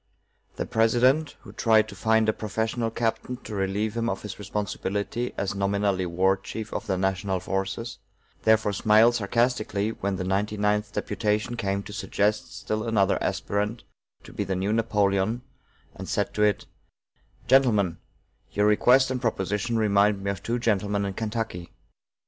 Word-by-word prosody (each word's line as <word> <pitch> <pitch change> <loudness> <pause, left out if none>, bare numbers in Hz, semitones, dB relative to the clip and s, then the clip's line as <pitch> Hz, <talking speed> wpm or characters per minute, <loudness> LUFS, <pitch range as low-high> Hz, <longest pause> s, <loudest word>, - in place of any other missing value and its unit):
The - - -3
President, 125 +7 +2
who - - -12
tried 110 -2 +3
to - - -9
find 110 0 +2
a 110 - +3
professional 110 +2 -2
captain 115 +2 -2
to 110 - -8
relieve 100 +2 -1
him 115 0 0
of - - -4
his 105 - -7
responsibility 105 +3 -3
as 100 0 -1
nominally 100 -1 0
war 95 +3 +2
chief 110 +2 -7
of 110 - -4
the 95 -2 0
national 95 0 0
forces, 95 +6 -3 0.4
therefore 110 -2 +3
smiled 110 +4 +5
sarcastically 110 -2 0
when 100 -3 -3
the 95 - -3
ninety 100 +3 -1
ninth 105 0 +1
deputation 105 +3 -1
came 100 -3 -2
to 105 - -9
suggest 105 +4 -1
still 110 0 -2
another 100 -3 +2
aspirant 105 +3 -2 0.4
to - - -13
be - - -2
the 95 -1 -2
new 95 +3 0
Napoleon, 105 0 +1 0.5
and - - -8
said - - -1
to 105 - -2
it: 105 -1 +2 0.8
"Gentlemen, 110 -9 +3 0.5
your 105 - +1
request 125 +5 +4
and 125 -1 -2
proposition 105 0 -1
remind 100 -2 +3
me 100 - 0
of 100 -1 -6
two 115 +4 -1
gentlemen 105 -3 0
in 100 - -3
Kentucky. 110 -5 -4
105 Hz, 155 wpm, -26 LUFS, 100-115 Hz, 0.8 s, smiled